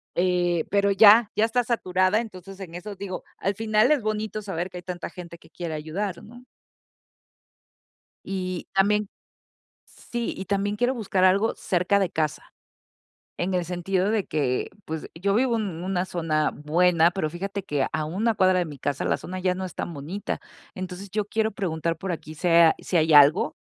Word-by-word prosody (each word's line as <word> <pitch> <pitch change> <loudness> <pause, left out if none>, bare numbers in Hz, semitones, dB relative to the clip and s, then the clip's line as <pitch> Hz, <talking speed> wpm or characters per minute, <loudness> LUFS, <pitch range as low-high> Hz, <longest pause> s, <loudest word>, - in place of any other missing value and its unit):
eh, 175 -2 +1
pero 200 0 +3
ya, 210 +2 +7
ya 215 +2 +3
está 245 +2 +1
saturada. 185 -4 +1
Entonces, 195 -4 -8
en 175 -3 -8
eso, 200 +3 -7
digo, 190 -1 -6
al 195 - -1
final 215 +4 +2
es 295 -4 +3
bonito 215 0 -2
saber 190 -3 -4
que 180 - -9
hay 180 - -8
tanta 175 -2 -5
gente 170 -1 -10
que 160 - -20
quiere 165 0 -5
ayudar, 170 +5 -4
¿no? 240 +3 -13 1.8
Y 185 -2 -4
también 205 +1 +2 0.8
Sí, 240 -1 -5
y 190 - -6
también 200 +1 0
quiero 245 +3 +1
buscar 200 -5 -1
algo 200 +4 +3
cerca 180 +2 +1
de 190 -3 0
casa. 155 -2 -3 0.8
En 185 +2 -2
el 180 -1 +1
sentido 180 +3 -1
de 215 -3 0
que, 135 -5 -1
pues, 160 0 -5
yo 200 +1 +1
vivo 245 0 +2
en 190 -6 -3
una 185 -1 -1
zona 160 -4 0
buena, 170 +2 +3
pero 175 -4 -2
fíjate 195 +3 -5
que, 145 -7 0
a 155 +1 -1
una 210 +9 0
cuadra 185 -1 +3
de - - 0
mi 150 -4 -9
casa 140 +1 -2
la - - +1
zona 185 +1 -7
ya 185 0 +1
no 190 - -4
es 180 - -7
tan 175 - -4
bonita. 165 +7 -5 0.3
Entonces, 185 +1 -7
yo 210 +1 -1
quiero 220 +1 0
preguntar 165 -5 -2
por 190 +1 -4
aquí 155 -1 -7
se 170 0 +4
a 160 - +6
si 180 - -2
hay 160 -1 +3
algo, 145 +4 +6
185 Hz, 185 wpm, -25 LUFS, 170-205 Hz, 1.8 s, ya